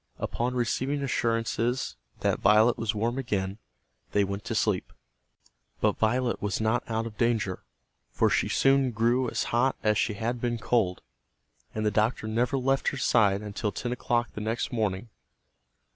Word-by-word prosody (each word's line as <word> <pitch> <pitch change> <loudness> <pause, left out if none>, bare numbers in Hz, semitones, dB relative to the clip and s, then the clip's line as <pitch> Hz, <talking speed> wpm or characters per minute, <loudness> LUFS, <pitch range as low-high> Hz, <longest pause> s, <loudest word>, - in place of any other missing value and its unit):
Upon 125 +2 -2
receiving 130 +4 -1
assurances 115 - 0 0.3
that - - +1
Violet 110 +3 +5
was 110 -1 -2
warm 115 +5 -1
again, 100 -5 -2 0.5
they 100 - +4
went 100 +1 -4
to 115 - -3
sleep. 105 -4 0 0.9
But - - +1
Violet 120 +2 +1
was 100 -1 -1
not 110 +2 +1
out 115 0 -1
of 110 -2 -8
danger, 115 -6 0 0.5
for - - +2
she - - +1
soon 135 -1 +3
grew 120 +2 +1
as - - -1
hot 130 +3 +3
as 105 -1 +2
she 105 - 0
had 120 +2 -2
been 120 -1 0
cold. 110 -5 0 0.7
And 110 0 -1
the 105 - +2
doctor 110 +2 0
never 120 +4 0
left 135 +1 +1
her 140 - 0
side 105 -5 +3
until 105 +1 -3
ten 120 +5 -4
o'clock 120 -1 0
the 105 - -6
next 110 +3 -2
morning. 110 -1 -1
115 Hz, 160 wpm, -27 LUFS, 105-120 Hz, 0.9 s, Violet